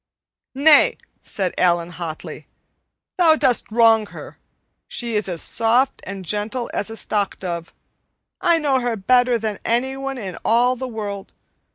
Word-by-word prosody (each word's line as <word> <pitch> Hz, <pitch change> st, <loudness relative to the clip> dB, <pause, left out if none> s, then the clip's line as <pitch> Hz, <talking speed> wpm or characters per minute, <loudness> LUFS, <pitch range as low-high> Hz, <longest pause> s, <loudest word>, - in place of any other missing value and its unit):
"Nay," 295 Hz, +2 st, +5 dB, 0.2 s
said 190 Hz, -4 st, -2 dB
Allan 175 Hz, -1 st, +2 dB
hotly, 165 Hz, -2 st, -7 dB, 0.7 s
"thou 325 Hz, -3 st, +6 dB
dost 250 Hz, -7 st, +1 dB
wrong 225 Hz, -1 st, +4 dB
her. -, -, -11 dB, 0.5 s
She 235 Hz, -2 st, -3 dB
is 210 Hz, -2 st, 0 dB
as 170 Hz, -2 st, -1 dB
soft 240 Hz, +4 st, +1 dB
and 190 Hz, -1 st, -7 dB
gentle 210 Hz, +6 st, -3 dB
as 205 Hz, -, -2 dB
a 225 Hz, -, -7 dB
stockdove. 185 Hz, -6 st, -3 dB, 0.7 s
I 340 Hz, -1 st, +4 dB
know 285 Hz, -4 st, +1 dB
her 240 Hz, -2 st, -1 dB
better 245 Hz, +4 st, +3 dB
than 215 Hz, -3 st, -4 dB
anyone 265 Hz, +3 st, -1 dB
in 195 Hz, -6 st, -6 dB
all 245 Hz, +3 st, +3 dB
the 260 Hz, +1 st, -5 dB
world. 205 Hz, -4 st, -6 dB
225 Hz, 140 wpm, -21 LUFS, 195-255 Hz, 0.7 s, thou